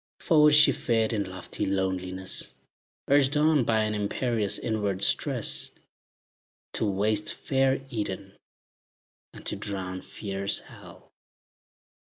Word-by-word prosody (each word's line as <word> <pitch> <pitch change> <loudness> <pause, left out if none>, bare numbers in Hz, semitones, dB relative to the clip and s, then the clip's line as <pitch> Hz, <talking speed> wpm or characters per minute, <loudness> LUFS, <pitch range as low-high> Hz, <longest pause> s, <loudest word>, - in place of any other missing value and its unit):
Forward 150 -3 +5
she 150 +1 +7
fared 115 -2 0
in 105 -2 0
lofty 95 0 -5
loneliness, 95 -1 -1 0.5
Urged 140 +1 +3
on 150 -2 +4
by 110 -1 +2
an 110 0 -1
imperious 105 0 -1
inward 105 -4 -1
stress, - - +1 1.0
To 110 - +1
waste 105 +2 +1
fair 135 0 0
Eden, 100 -3 -4 1.0
and - - -13
to - - 0
drown 95 -2 -5
fierce 100 -1 -2
Hell. - - -12
105 Hz, 110 wpm, -27 LUFS, 95-130 Hz, 1.0 s, she